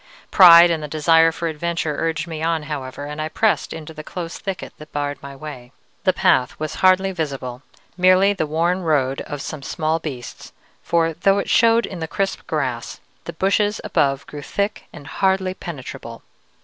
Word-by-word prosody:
Pride 175 -2 +9
and 165 -2 -1
the 150 - -5
desire 165 +2 +4
for 170 +1 -4
adventure 160 -1 -2
urged 165 +1 -1
me 160 -2 -6
on, 165 -1 0
however, 145 -2 -6
and 150 +1 -5
I 155 - -3
pressed 215 +5 +1
into 160 0 -8
the 155 0 -9
close 170 +1 -6
thicket 195 -3 -5
that 155 0 -12
barred 145 0 -3
my 140 0 -9
way. 135 -4 -10 0.3
The 185 - +5
path 180 -10 +1
was 155 0 -3
hardly 190 +1 +4
visible: 135 -7 -4 0.4
merely 185 +2 +5
the 160 -6 -2
worn 170 +4 0
road 140 -5 0
of 145 -1 -6
some 155 - -6
small 155 +3 -1
beasts, 135 -7 -8 0.3
for, 165 -1 +1
though 195 +5 +2
it 200 - -2
showed 230 -1 +4
in 185 - -8
the 160 - -4
crisp 195 +5 -3
grass, - - -3 0.3
the - - -6
bushes 205 +2 +1
above 140 -1 0
grew 145 - -8
thick 200 +7 -3
and 145 - -12
hardly 190 +1 0
penetrable. 130 -9 -8
160 Hz, 180 wpm, -21 LUFS, 145-185 Hz, 0.4 s, Pride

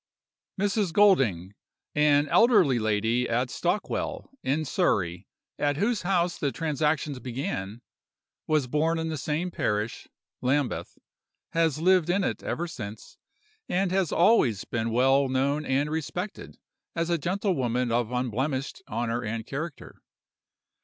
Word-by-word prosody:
"Mrs. 200 -3 0
Golding, 120 - +3 0.4
an 150 0 +4
elderly 195 - +5
lady 110 +3 +1
at 125 +2 0
Stockwell, 175 +4 -2
in 150 +4 0
Surrey, 90 - 0 0.3
at 145 -1 +1
whose 215 +5 +1
house 180 -2 0
the 140 - 0
transactions 150 -3 -1
began, 120 -4 -4 0.6
was 155 -3 +2
born 155 +6 +1
in 160 0 -2
the 160 - -2
same 160 +5 -2
parish 105 -6 -2 0.3
(Lambeth), 135 +1 -1 0.5
has 165 -3 +1
lived 180 0 +3
in 195 +3 +2
it - - -2
ever 175 +2 -3
since, 110 -9 -9 0.5
and 185 0 +1
has 190 -3 +1
always 165 - +3
been 115 -1 -2
well 135 +3 +3
known 140 +3 +1
and 140 +3 0
respected 175 +5 -5 0.4
as 165 0 -1
a 170 - +1
gentlewoman 135 - 0
of 120 0 0
unblemished 130 - -2
honor 115 +2 -2
and 110 0 -4
character. 150 +2 -7
145 Hz, 125 wpm, -27 LUFS, 120-170 Hz, 0.6 s, elderly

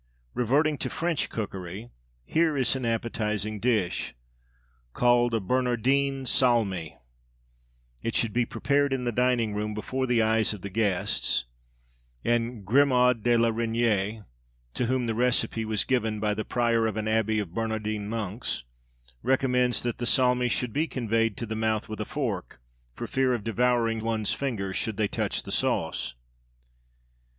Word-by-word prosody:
Reverting 145 +5 +2
to - - -2
French 170 -3 -1
cookery, 95 +1 -5 0.3
here 160 - +2
is 130 0 +1
an 130 -2 -3
appetising 110 -2 -1
dish, 105 - 0 0.8
called 120 -1 +3
a - - +2
Bernardin 130 +5 +1
Salmi. 110 - +1 1.0
It 115 - -3
should 115 -3 +1
be 120 -1 +1
prepared 140 0 +1
in 130 -2 -1
the 120 - 0
dining 120 -2 +1
room, 105 +1 -2
before 130 +5 -2
the 120 -1 +2
eyes 110 0 +2
of 100 - -12
the 100 - -5
guests; 100 - 0 0.8
and 120 -2 0
Grimod 125 0 +4
de 120 +1 +3
la 115 0 +3
Reyniere 115 -2 0 0.5
(to 125 - -1
whom 130 0 +1
the 115 - 0
recipe 120 -1 +1
was 110 -2 -1
given 110 -5 0
by 105 0 +1
the 110 +1 -3
prior 115 -2 +2
of 110 -1 -3
an 110 0 -2
abbey 110 0 +1
of 100 -5 -3
Bernardin 110 -2 -2
monks) 110 - -3 0.6
recommends 125 -1 +2
that 120 -1 -2
the 120 - -2
salmi 125 -1 +3
should 120 -1 -1
be 155 +3 +1
conveyed 115 -5 0
to 120 - -3
the 110 - -4
mouth 110 -1 0
with 110 0 -5
a - - -2
fork, 110 - -3 0.4
for - - -5
fear 130 -1 +1
of 110 - -5
devouring 115 0 +1
one's 110 -1 0
fingers, 100 -9 -3
should 110 -3 -2
they 110 -2 +2
touch - - -2
the - - -7
sauce. - - -1
115 Hz, 155 wpm, -27 LUFS, 110-125 Hz, 1.0 s, Grimod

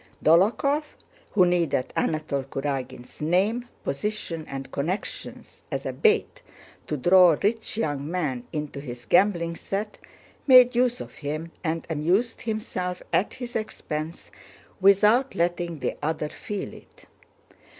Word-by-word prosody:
Dólokhov, 215 - +4 0.5
who 185 -4 +5
needed 170 -7 +1
Anatole 155 -4 -1
Kurágin's 135 -2 -5
name, 200 +10 +1 0.2
position, 165 +1 -3
and 135 -1 -6
connections 170 +8 -5
as - - -3
a - - -2
bait 445 -1 +2 0.5
to 150 - -2
draw 175 +2 +6
rich 220 +1 0
young 145 -8 -2
men 150 -9 -2
into 150 -2 -4
his 120 -3 -8
gambling 170 - +3
set, 205 +4 -4 0.5
made 250 -2 +8
use 245 0 +2
of - - -9
him 155 +3 -5
and 165 -1 -2
amused 175 +9 0
himself 190 -5 -3
at 200 - +1
his 245 -1 -7
expense 160 -7 -4 0.5
without 210 +7 +4
letting 175 -1 -1
the - - -2
other 155 0 -1
feel 210 +1 -6
it. - - -16
175 Hz, 125 wpm, -25 LUFS, 150-210 Hz, 0.5 s, made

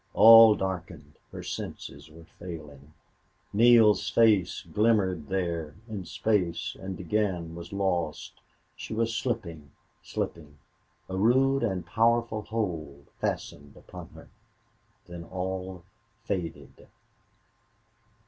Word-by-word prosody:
All 115 +2 +9
darkened 95 -3 -5 0.2
her - - -8
senses 70 +2 -7
were 80 +1 -15
failing. 75 -4 -10 0.6
Neale's 110 -2 +5
face 105 -4 +3
glimmered 100 -7 +1
there 85 -5 -3
in 105 -5 -6
space 90 -1 -1
and 95 -1 -6
again 90 -3 -1
was 85 0 -9
lost. 90 -5 -2 0.3
She 110 - -7
was 115 0 0
slipping 85 - -4 0.3
slipping 75 -3 -5 0.5
A 95 - -5
rude 130 +7 +3
and 95 -7 -2
powerful 115 +2 +1
hold 80 -11 -5
fastened 70 -1 -4
upon - - -11
her. - - -14 0.8
Then 85 -1 -9
all 95 0 -5 0.4
faded. 90 -6 -6
95 Hz, 100 wpm, -27 LUFS, 85-110 Hz, 0.8 s, All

